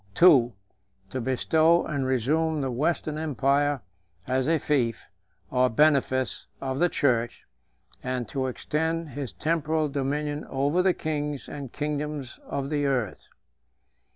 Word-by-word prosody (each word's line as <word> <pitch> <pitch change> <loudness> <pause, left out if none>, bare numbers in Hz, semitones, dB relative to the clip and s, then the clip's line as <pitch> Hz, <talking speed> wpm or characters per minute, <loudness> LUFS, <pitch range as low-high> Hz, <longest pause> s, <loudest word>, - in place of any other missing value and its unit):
II. 135 -10 +7 0.6
To 130 - -3
bestow 160 +7 +3
and 140 -4 -2
resume 150 +5 +1
the 135 -1 -1
Western 155 +3 -1
empire 145 -2 +1 0.4
as 130 +1 0
a 165 0 +3
fief 125 -7 0 0.5
or 125 0 +3
benefice 130 0 +2
134 135 - -5
of 130 - -2
the 175 +1 +4
church, 120 -6 0 0.6
and 125 -1 -3
to 135 -2 -2
extend 160 +5 -2
his 135 -3 -5
temporal 155 - 0
dominion 145 +2 -2
over 140 +6 +1
the 185 -1 +3
kings 150 -3 -3
and 140 -4 -7
kingdoms 150 -3 -4
of 140 +1 -3
the 145 -1 +1
earth. 125 -7 -2
145 Hz, 130 wpm, -26 LUFS, 130-155 Hz, 0.6 s, II